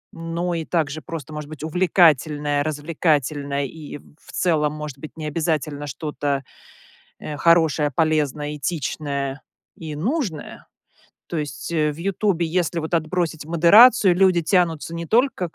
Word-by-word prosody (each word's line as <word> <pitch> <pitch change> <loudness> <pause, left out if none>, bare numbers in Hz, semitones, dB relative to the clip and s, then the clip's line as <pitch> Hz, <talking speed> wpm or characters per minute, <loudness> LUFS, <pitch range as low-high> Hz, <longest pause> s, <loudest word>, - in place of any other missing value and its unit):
но 170 +1 -3
и 165 -1 -2
также 155 -2 -2
просто, 155 -2 -7
может 150 -1 -6
быть, 155 -1 -9
увлекательное, 155 -4 +2
развлекательное 145 -2 -1
и 150 +2 -8
в 150 +1 -19
целом 155 -4 +1
может 150 -3 -7
быть 155 +2 -10
не 155 - -5
обязательно 150 -2 -2
что-то, 145 0 -3 0.8
э, 150 - -6
хорошее, 160 -3 +3
полезное, 150 -1 0
этичное 140 -2 -3 0.4
и 155 -2 -7
нужное. 200 - -3 0.6
То 170 - -4
есть, 145 -1 -5
э, 155 -2 +1
в - - -12
"Ютубe", 190 -1 0
если 170 0 -1
вот 160 +1 -6
отбросить 165 -1 -1
модерацию, 175 +4 +6
люди 185 -2 +4
тянутся 165 -2 +1
не 170 0 -5
только 230 - +1
к - - -28
155 Hz, 140 wpm, -22 LUFS, 145-170 Hz, 0.8 s, модерацию